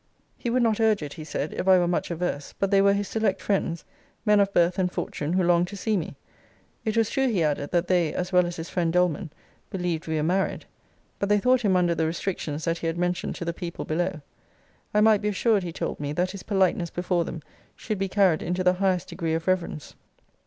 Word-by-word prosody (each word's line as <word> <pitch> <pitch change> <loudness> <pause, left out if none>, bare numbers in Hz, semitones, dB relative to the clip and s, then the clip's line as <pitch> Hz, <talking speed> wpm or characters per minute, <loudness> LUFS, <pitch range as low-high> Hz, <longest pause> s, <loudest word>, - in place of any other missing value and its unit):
He 240 - -4
would 245 +1 +2
not 225 -2 +2
urge 220 -6 +3
it, 145 -1 -6
he 160 - -8
said, 155 -1 -4
if - - -3
I 190 -1 +7
were 175 -1 +2
much 175 - -1
averse: 170 -4 -3
but 195 0 0
they 195 -1 +5
were 200 0 +5
his 200 0 -1
select 215 -3 0
friends; 175 -4 -1 0.4
men 210 -1 +5
of 200 0 +3
birth 175 +1 +2
and 180 -1 +1
fortune, 150 -1 -3
who 185 0 +2
longed 175 0 +3
to 200 - -8
see 215 +3 0
me. 175 -5 -3 0.7
It 220 0 -1
was 225 -1 +2
true, 270 0 +1
he 200 -9 +1
added, 145 -1 -1
that 175 0 +1
they, 175 -4 +2
as 180 +1 -3
well 180 -1 +5
as 175 - -5
his 165 0 -6
friend 170 -2 0
Doleman, 180 0 +1 0.4
believed 175 -4 -3
we 160 - -1
were 150 - 0
married: 185 +4 0 0.5
but 200 - -1
they 210 - +5
thought 250 +4 +3
him 200 -5 +2
under 175 -1 +3
the 160 -1 0
restrictions 160 -3 -3
that 165 0 0
he 165 - -3
had 165 +1 -2
mentioned 180 +1 -1
to 170 - -5
the 170 - -1
people 170 0 -6
below. 170 0 -1 0.7
I 210 - +3
might 215 -1 +5
be 210 - -1
assured, 210 +1 +2
he 175 -2 -5
told - - -4
me, 145 0 -3
that 180 +3 0
his 195 -1 -8
politeness 185 -4 +1
before 175 0 0
them 165 -2 -7 0.3
should 215 -3 -4
be 195 0 -1
carried 185 -5 +3
into 180 +2 -1
the 180 0 +4
highest 185 -1 0
degree 165 -2 -2
of 165 0 -3
reverence. 180 -5 -1
180 Hz, 240 wpm, -26 LUFS, 170-200 Hz, 0.7 s, I